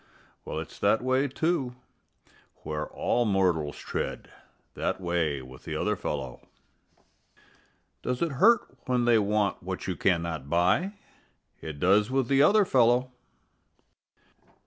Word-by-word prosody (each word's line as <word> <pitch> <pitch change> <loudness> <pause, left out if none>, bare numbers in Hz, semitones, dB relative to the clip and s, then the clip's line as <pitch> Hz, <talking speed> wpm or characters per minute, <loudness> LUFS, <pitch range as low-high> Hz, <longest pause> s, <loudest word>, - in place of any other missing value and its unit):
Well, - - -5
it's 80 0 -7
that 110 +4 +2
way, 130 +2 +2
too, 140 -3 -1 0.9
where 75 0 -3
all 120 - 0
mortals 90 -8 +1
tread - - -5 0.4
That - - -2
way 85 -6 -1
with 65 +1 -13
the - - -5
other - - 0
fellow. 65 -4 -5 1.6
Does 125 +4 -2
it 165 - -1
hurt 230 +2 +6 0.3
when 125 -1 +1
they 120 -2 +5
want 105 -1 0
what 95 +1 -5
you 95 - -2
cannot 85 -6 -1
buy? 90 - +2 0.7
It 75 -2 -7
does 100 - +3
with 130 -2 0
the 135 0 +4
other 205 +7 +5
fellow. 125 -2 +3
105 Hz, 125 wpm, -27 LUFS, 85-130 Hz, 1.6 s, hurt